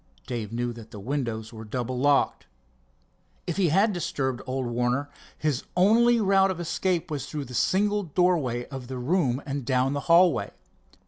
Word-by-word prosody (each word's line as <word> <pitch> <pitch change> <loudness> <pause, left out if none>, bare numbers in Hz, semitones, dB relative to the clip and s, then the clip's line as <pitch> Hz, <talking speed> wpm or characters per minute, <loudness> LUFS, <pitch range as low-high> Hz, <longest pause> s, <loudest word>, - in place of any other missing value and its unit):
Dave 115 -4 -4
knew 120 +1 -2
that 115 -1 -11
the 105 - -9
windows 115 -2 -3
were 110 0 -8
double 125 +3 -3
locked. 145 +1 +2 1.0
If 175 - -3
he 185 -4 +3
had 200 +7 +3
disturbed 130 -7 -2
old 130 0 -2
Warner, 125 +4 -1 0.3
his 150 -4 -1
only 230 +5 +5
route 195 -2 +4
of 185 -2 -3
escape 175 0 -1
was 145 -2 -3
through 150 -3 -5
the 125 - -10
single 205 - +2
doorway 155 -9 +1
of 135 -3 -7
the 130 0 -5
room 135 -1 0
and 140 -1 -3
down 130 +2 +1
the 145 - -1
hallway. 170 -3 +5
140 Hz, 170 wpm, -26 LUFS, 125-180 Hz, 1.0 s, only